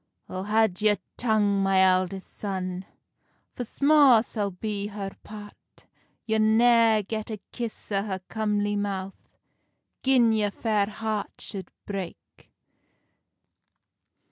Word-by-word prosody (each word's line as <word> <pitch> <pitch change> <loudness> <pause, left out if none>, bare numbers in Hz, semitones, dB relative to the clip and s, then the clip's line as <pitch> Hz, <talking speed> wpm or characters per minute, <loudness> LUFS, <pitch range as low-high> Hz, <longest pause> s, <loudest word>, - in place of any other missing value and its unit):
"O 185 - -5
had 210 -1 +1
your 210 -1 +4 0.2
tongue, 210 -4 +2
my 195 -1 +3
eldest 185 0 +1
son, 185 -2 -4 0.7
For 245 - -4
sma 280 -2 +5
sal 205 -3 -2
be 200 +2 -4
her 200 -2 -6
part; 210 -1 -13 0.4
You'll 220 -1 +1
nae 225 0 +4
get 215 +2 -5
a 215 - -4
kiss 235 -3 -6
o 195 -1 +1
her 195 -2 -4
comely 205 -1 -1
mouth 195 -2 -4 0.7
Gin 255 -4 +4
your 215 -2 +1
very - - -19
fair 215 -3 +2
heart 215 -2 -3
should 190 -4 -7 0.2
break." 195 -4 -8
210 Hz, 120 wpm, -26 LUFS, 195-220 Hz, 0.7 s, sma